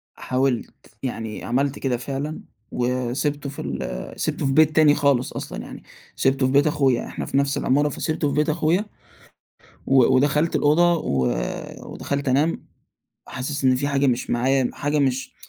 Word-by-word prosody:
حاولت، 130 -5 -2
يعني 115 -4 -4
عَمَلت 135 +3 -1
كده 125 -3 -1
فعلًا، 140 +5 -4 0.3
وسِبتُه 130 +4 -1
في 140 - -7
ال - - -5
سِبتُه - - -1
في 135 - +1
بيت 155 +1 +4
تاني 150 -2 +6
خالص 140 -4 +1
أصلًا - - -6
يعني، - - -10 0.3
سِبتُه 135 0 +2
في 130 - +1
بيت 140 +2 +4
أخويا، 135 -5 +1
إحنا - - -5
في 135 - -1
نفس 140 0 +1
العمارة 145 +3 +2
فسِبتُه 155 +1 -2
في - - -3
بيت 150 +1 +2
أخويا، 165 +6 +1 1.0
و 135 -2 +5
ودخلت 150 +4 +2
الأوضة 170 +4 +4
و 65 - 0 0.7
ودخلت 140 -1 -3
أنام، 145 +6 +1 0.6
حاسس 135 +2 -4
إن 130 -1 +4
في 140 +3 -1
حاجة 140 -1 +1
مش 120 -2 0
معايا، 130 +1 +2
حاجة 145 +1 -1
مش 130 -1 0
140 Hz, 160 wpm, -23 LUFS, 130-150 Hz, 1.0 s, تاني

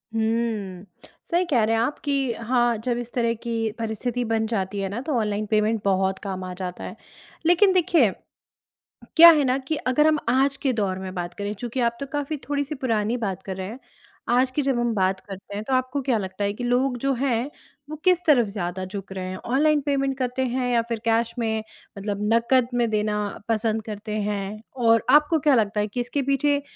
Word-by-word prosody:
हुँ। 220 -4 -1 0.5
सही 355 +2 +2
कह 240 -6 +3
रहे 225 +1 +2
हैं 225 - +2
आप 290 - -1
कि 275 -4 0
हाँ, 240 0 +1
जब 240 +2 -2
इस 240 0 -6
तरह 235 -2 +1
की 225 -2 -1
परिस्थिति 235 +2 -2
बन 220 0 +1
जाती 200 -3 -2
है 195 - -2
ना, 215 +5 -4
तो 300 +1 -3
ऑनलाइन 210 -1 -1
पेमेंट 215 0 +2
बहुत 190 0 +1
काम 190 -2 -4
आ 185 0 -5
जाता 180 -1 -6
है। - - -7 0.5
लेकिन 370 +3 +5
देखिए 335 - +4 1.1
क्या 335 +1 +11
है 300 -3 +4
ना, 255 0 +2
कि 275 +4 -3
अगर 275 +4 +2
हम 310 -1 +3
आज 270 +2 +2
के 265 -1 0
दौर 195 -5 -1
में 190 0 -6
बात 175 0 -4
करें 205 +1 -4
चूँकि 240 +4 -4
आप 235 0 +1
तो 275 - -3
काफ़ी 290 +1 -2
थोड़ी-सी 285 +1 -1
पुरानी 230 -3 0
बात 200 -6 -3
कर 190 -1 -6
रहे 190 0 -4
हैं। 230 - -8 0.5
आज 255 +2 +3
की 285 +3 -1
जब 270 -3 +1
हम 240 -1 +1
बात 190 -1 +1
करते 195 +1 -9
हैं 210 - -3
तो 265 - -4
आपको 255 +2 0
क्या 250 -3 +1
लगता 190 +1 -4
है 200 - 0
कि 245 +4 -6
लोग 250 +1 +1
जो 275 +1 +1
हैं 250 0 -1 0.4
वो 310 - -5
किस 365 -1 +4
तरफ 250 -7 +5
ज़्यादा 185 -2 -4
झुक 195 0 -7
रहे 185 -1 -4
हैं? 185 - -5
ऑनलाइन 295 +7 +2
पेमेंट 275 -1 0
करते 255 0 -1
हैं 250 0 -1
या 235 -1 +3
फ़िर 230 -1 -2
कैश 230 0 +1
में 220 -1 -1 0.4
मतलब 200 0 -3
नकद 235 +2 +3
में 240 -1 +2
देना 210 0 0 0.3
पसंद 220 0 0
करते 210 0 -6
हैं? 205 0 -3 0.2
और 230 -2 +3
आपको 300 +2 +5
क्या 290 -2 +4
लगता 210 -2 +1
है 210 - +1
कि 245 - -4
इसके 245 +4 -1
पीछे 280 +1 +1
230 Hz, 215 wpm, -24 LUFS, 210-265 Hz, 1.1 s, क्या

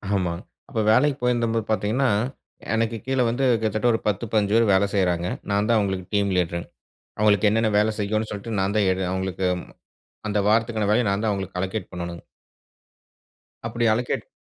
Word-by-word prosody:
ஆமா. 90 -3 0 0.4
அப்ப 120 -6 -3
வேலைக்கு 140 +4 +3
போயிருந்தபோது 115 -2 +1
பார்த்தீங்கன்னா, 115 +5 +1 0.6
எனக்கு 115 0 0
கீழே 130 -1 +1
வந்து 130 +4 -1 0.2
கிட்டத்தட்ட 110 +2 0
ஒரு 115 - 0
10-15 105 0 0
பேரு 115 0 +5
வேல 100 +1 +4
செய்றாங்க. 90 -2 +1 0.2
நான் 100 +2 +1
தான் 115 - +4
அவுங்களுக்கு 95 -3 -1
டீம் 100 -1 +2
லீடர்ங். 85 -1 -1 0.5
அவுங்களுக்கு 105 -1 +4
என்னென்ன 110 0 +2
வேலை 110 +1 +2
செய்யணும் 110 +1 -1
சொல்ட்டு, 105 +1 -5
நான் 100 +2 0
தான் 100 -3 +3
எடு 95 - -2
அவுங்களுக்கு 95 0 -2 0.8
அந்த 105 - 0
வாரத்துக்கான 110 -1 +1
வேலைய 110 +1 +3
நான் 100 +2 -1
தான் 110 - +2
அவுங்களுக்கு 95 -2 -4
அலோகேட் 95 0 -4
பண்ணணும். 85 -1 -6 1.5
அப்டி 120 +1 -1
அலோகேட் 120 +2 -2
105 Hz, 160 wpm, -24 LUFS, 95-115 Hz, 1.5 s, பேரு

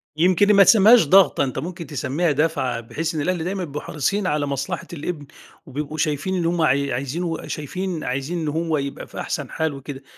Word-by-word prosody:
يمكن 185 +5 +4
ما 200 -1 +8
تسميهاش 220 +1 +7
ضغطة، 190 +4 +5
أنت 130 -1 -3
ممكن 170 +3 -6
تسميها 150 +4 -1
دَفعة، 145 -5 0
بحيث 160 +8 -4
إن 155 - -1
الأهل 175 +1 -1
دايمًا 185 +2 -3
بيبقوا 150 -3 -5
حريصين 185 +7 -1
على 150 -2 0
مصلحة 140 -1 -3
الابن، 155 -1 -5 0.4
وبيبقوا 150 +3 -5
شايفين 155 +4 -1
إن 175 -2 -1
هُم 170 0 0
عاي 140 -2 +2
عايزينه 140 +8 -3
وشايفين 165 +2 -4
عايزين 140 +7 -3
إن 160 - -3
هو 160 +1 0
يبقى 140 -1 -5
في - - -9
أحسن - - -4
حال 160 -2 -2
وكده، 135 0 -8
155 Hz, 190 wpm, -22 LUFS, 140-175 Hz, 0.4 s, ما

